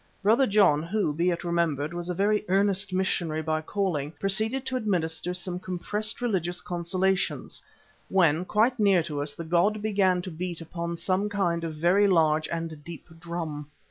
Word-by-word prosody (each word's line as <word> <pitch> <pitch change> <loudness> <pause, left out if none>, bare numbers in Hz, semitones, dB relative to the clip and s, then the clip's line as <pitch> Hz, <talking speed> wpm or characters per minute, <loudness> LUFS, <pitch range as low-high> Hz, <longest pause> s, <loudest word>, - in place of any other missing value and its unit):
Brother 230 +6 +4
John, 195 -8 +4
who, 170 -1 -1
be 170 +4 +1
it 170 -1 -2
remembered, 170 -3 0
was 175 0 -4
a 180 - -2
very 205 +3 +2
earnest 195 +1 +1
missionary 175 -4 -1
by 155 0 -1
calling, 160 -5 -2
proceeded 220 +8 0
to 260 - -2
administer 180 -7 -1
some 180 0 -3
compressed 210 +5 -2
religious 180 -6 0
consolations, 185 +2 -1 0.5
when, 175 -3 +3
quite 225 +6 +1
near 195 -5 +4
to 150 -3 -4
us, 145 0 -3
the 170 - -6
god 175 +6 +2
began 195 -4 +1
to 185 - -6
beat 175 +1 -5
upon 170 +1 -5
some 190 +4 0
kind 175 -5 0
of 160 -2 -4
very 180 +6 +3
large 155 -4 +3
and 165 -3 -5
deep 170 0 -10
drum. 165 -3 -5
175 Hz, 170 wpm, -27 LUFS, 165-200 Hz, 0.5 s, Brother